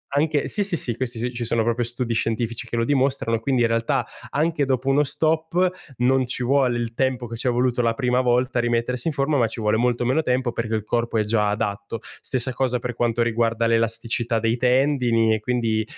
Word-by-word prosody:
anche 150 0 +1
sì, 205 - 0
sì, 190 -4 -2
sì. 120 -6 -3
Questi 120 0 -3
ci 120 0 -3
sono 115 0 +1
proprio 120 +1 0
studi 120 0 -2
scientifici 115 0 -2
che - - -4
lo 115 - +1
dimostrano, 130 -4 +1
quindi 125 +1 +1
in - - +4
realtà 115 0 0 0.2
anche 155 0 0
dopo 130 -1 -1
uno 140 +2 +4
stop 160 +5 +1 0.3
non 130 +1 +2
ci 125 0 0
vuole 130 -1 +2
il 115 -1 -3
tempo 130 -1 -1
che 115 0 -7
ci 120 +3 -2
è - - +4
voluto 125 0 +1
la 115 -1 +1
prima 125 0 +1
volta 125 0 +1
a - - +3
rimettersi 120 +3 -1
in 160 - 0
forma, 140 +1 +1
ma 115 - +3
ci 115 - -7
vuole 105 0 +1
molto 120 +1 +1
meno 130 +6 +2
tempo 125 -3 0
perché 115 -1 -2
il 110 - -2
corpo 115 +1 -1
è 110 - +2
già 105 -1 +1
adatto. 105 0 -3
Stessa 130 0 -3
cosa 125 -1 0
per 120 0 -4
quanto 120 0 0
riguarda 115 0 0
l'elasticità 115 +1 0
dei 115 +1 +1
tendini 125 -3 +2
e 110 - 0
quindi, 115 -1 0
120 Hz, 220 wpm, -23 LUFS, 115-130 Hz, 0.3 s, in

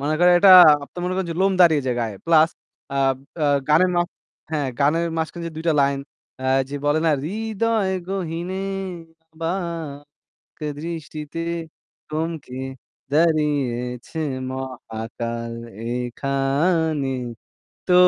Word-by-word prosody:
মানে 150 +2 0
করেন 175 +1 +6
এটা 195 - +8 0.3
আপনি 175 - -13
মনে 185 +1 -1
করেন 190 -3 -1
যে - - -8
লোম 195 - +3
দাঁড়িয়ে 160 -5 +6
যায় 125 -1 0
গায়ে। 110 -4 -3
Plus, 160 -1 +6 0.5
আ - - +1 0.5
আ - - +3 0.2
গানের 170 +5 +5
মাঝ 175 0 +2 0.5
হ্যাঁ, 145 -3 0
গানের 165 +4 +3
মাঝখানে 170 +1 -3
যে - - -11
২ 160 - -5
টা - - +5
লাইন, 140 0 +2 0.5
আ - - 0 0.2
যে 145 - -6
বলে 145 +1 +3
না? - - +5
"হৃদয়ে 220 +1 0 0.2
গহীনে 185 0 -3 0.7
অবাক 165 -4 -5 0.6
দৃষ্টিতে 160 -1 -6 0.7
থমকে 155 -4 -4 0.5
দাঁড়িয়েছে 145 -5 +1 0.3
মহাকাল 115 -2 -5 0.4
এখানে।" 140 +4 0 0.7
তো 180 - +3
155 Hz, 120 wpm, -22 LUFS, 135-170 Hz, 0.7 s, এটা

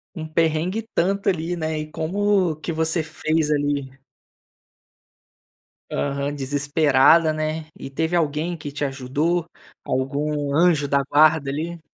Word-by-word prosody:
Um 160 -1 -5
perrengue 165 +6 0
e 225 - -15
tanto 195 +3 +1
ali, 175 0 -2
né. 160 -1 -2
E 155 0 -6
como 185 +1 +1
que 155 - -6
você 160 +1 0
fez 160 0 -1
ali? 145 -2 -1 1.9
Aham, 140 0 -2
desesperada, 145 +2 +3
né. 155 0 -3
E 135 - -7
teve 160 +5 -1
alguém 160 +2 0
que 145 -2 -7
te 145 0 -2
ajudou, 145 +6 -1 0.4
algum 145 +2 -1
anjo 160 -3 +3
da 140 0 +2
guarda, 150 0 +3
ali? 165 +3 -4
155 Hz, 130 wpm, -22 LUFS, 145-165 Hz, 1.9 s, desesperada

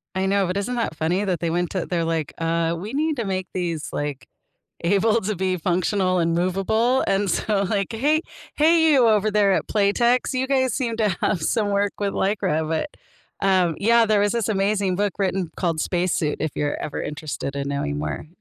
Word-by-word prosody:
I 190 0 0
know, 200 0 +2
but 180 +2 -2
isn't 245 +5 -2
that 230 -9 -2
funny 175 +6 0
that 180 -5 -1
they 170 0 -1
went 175 +1 -1
to 185 -3 -2
they're 170 -2 -1
like, 165 -3 -2
"Uh, 165 0 0
we 205 +7 -7
need 310 +2 0
to 235 - -2
make 185 -1 -2
these, 170 -4 -3
like, 145 -2 -4 0.6
able 215 +6 +2
to 205 +1 -2
be 185 0 -1
functional 185 +2 +1
and 165 -1 +1
movable," 205 +8 +1
and 195 0 +1
so, 200 +2 0
like, 200 +2 -1
"Hey, 295 +8 +1 0.3
hey, 320 +1 +4
you 255 -4 +5
over 215 -1 +3
there 200 -2 +3
at - - -1
Playtex. 235 +6 +2
You 255 +1 0
guys 260 -3 +1
seem 230 -3 -2
to 215 -2 +2
have 190 -6 0
some 205 +5 0
work 200 0 +1
with 200 -1 -1
Lycra," 190 -6 0
but, 160 - -1 0.6
um, 180 -4 +3
yeah, 230 +2 +4
there 215 -1 +2
was 205 +2 +2
this 230 -2 -1
amazing 195 -2 +1
book 205 +1 0
written 190 -3 -1
called 165 -3 -1
Spacesuit 175 -4 0
if 155 -1 -1
you're 145 0 -1
ever 150 - -4
interested 150 -2 -5
in 140 0 -3
knowing 75 - -2
more. 75 - -4
195 Hz, 200 wpm, -23 LUFS, 170-215 Hz, 0.6 s, you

